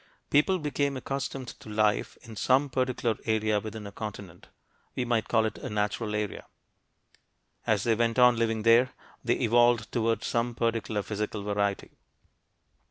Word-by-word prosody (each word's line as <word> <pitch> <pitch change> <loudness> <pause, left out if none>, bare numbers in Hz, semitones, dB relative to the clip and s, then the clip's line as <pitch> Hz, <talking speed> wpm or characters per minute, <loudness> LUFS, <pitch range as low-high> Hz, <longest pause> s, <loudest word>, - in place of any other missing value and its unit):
People 155 +6 +4
became 145 -3 -1
accustomed 135 -1 -4
to - - -12
life 105 0 +1
in 115 -3 -10
some 135 +5 +2
particular 130 -4 0
area 110 -2 +1
within 110 0 -7
a 100 - -7
continent 100 -4 -8 0.5
(we 125 - -1
might 120 -2 0
call 110 -1 +3
it 110 - -4
a - - -6
"natural 105 +1 -1
area"). 105 -2 -3 1.2
As 105 -3 +2
they 115 - +3
went 115 +1 +1
on 125 -1 +7
living 115 -1 0
there, 115 +3 +5 0.3
they 120 - +2
evolved 120 -1 +3
towards 115 -1 0
some 120 0 -1
particular 115 -3 -1
physical 105 0 -3
variety. 100 -1 -1
115 Hz, 150 wpm, -28 LUFS, 105-120 Hz, 1.2 s, on